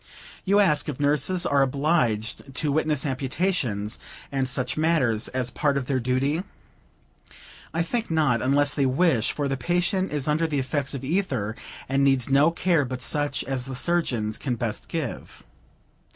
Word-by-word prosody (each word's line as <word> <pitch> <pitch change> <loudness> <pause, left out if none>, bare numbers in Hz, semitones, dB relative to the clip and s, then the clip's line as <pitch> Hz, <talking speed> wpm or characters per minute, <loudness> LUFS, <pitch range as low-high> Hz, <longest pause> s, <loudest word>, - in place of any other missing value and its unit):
You 200 +2 +4
ask 155 -6 +3
if 145 - -5
nurses 150 +5 +2
are 140 -1 +3
obliged 135 -3 0
to 150 +1 0
witness 155 -1 0
amputations 130 - -1 0.3
and 135 -2 -1
such 125 0 -1
matters, 155 -9 +1
as 125 -1 -2
a - - -25
part 145 -2 +1
of 135 - -2
their 130 0 0
duty? 130 +6 0 1.3
I 165 +1 0
think 230 +6 -2
not, 150 -8 +2
unless 145 +2 +2
they 140 -2 +1
wish; 130 -4 +2
for 145 -1 -2
the 135 0 -1
patient 175 +7 0
is 145 -2 -2
under 155 +2 +2
the 150 -2 -2
effects 140 +1 -1
of 135 - -6
ether, 130 - -1 0.3
and 135 +1 +1
needs 135 -2 +2
no 140 +4 +5
care 170 -2 +1
but 130 -1 -5
such 145 0 0
as 135 -1 -2
the 135 - -4
surgeons 125 -9 0
can 125 -4 -2
best 115 -1 -3
give. 160 -7 -5
140 Hz, 165 wpm, -25 LUFS, 130-160 Hz, 1.3 s, no